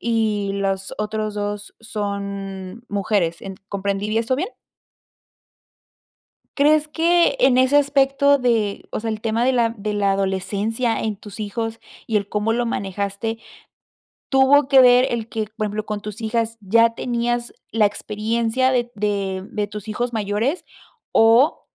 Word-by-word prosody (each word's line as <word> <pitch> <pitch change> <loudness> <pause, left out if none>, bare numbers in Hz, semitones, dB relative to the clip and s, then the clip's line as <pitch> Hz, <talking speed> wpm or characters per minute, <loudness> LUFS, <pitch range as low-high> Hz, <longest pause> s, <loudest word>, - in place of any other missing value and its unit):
y 215 -3 0
las 195 -1 -2
otros 215 0 -2
2 205 0 -4
son 200 -1 -5
mujeres, 195 -4 0
en 195 -1 -7
¿comprendí 200 +1 -2
bien 225 +1 +1
esto 255 +3 0
bien? 365 - -2 2.1
Crees 305 +1 +4
que 340 +7 +3
en 255 - +5
ese 260 +2 +4
aspecto 280 0 +4
de, 230 -5 0
o - - -3
sea, 225 - -4
el 215 -1 -4
tema 225 +1 0
de 260 - +3
la 235 -2 +2
de 210 0 -3
la 200 -1 +2
adolescencia 200 +5 -1
en 215 -2 -2
tus 205 0 -12
hijos 225 +2 -3 0.3
y 220 - 0
el 200 -1 -1
cómo 210 +2 0
lo 240 +1 0
manejaste, 200 +1 -3 0.9
tuvo 270 +1 +5
que 270 -2 +7
ver 250 +1 +6
el 230 -2 -3
que, 220 -2 -3
por 215 - 0
ejemplo, 210 +1 -3
con 210 -1 -4
tus 210 +1 -7
hijas 230 0 -1
ya 230 +4 +4
tenías 240 0 -2 0.2
la 220 -1 +3
experiencia 225 +5 -1
de 240 -1 0
de 200 -2 -2
de 210 -1 -2
tus 210 +1 -8
hijos 240 +3 -2
mayores 220 - -1 0.5
o, 230 +6 +4
220 Hz, 150 wpm, -21 LUFS, 205-240 Hz, 2.1 s, que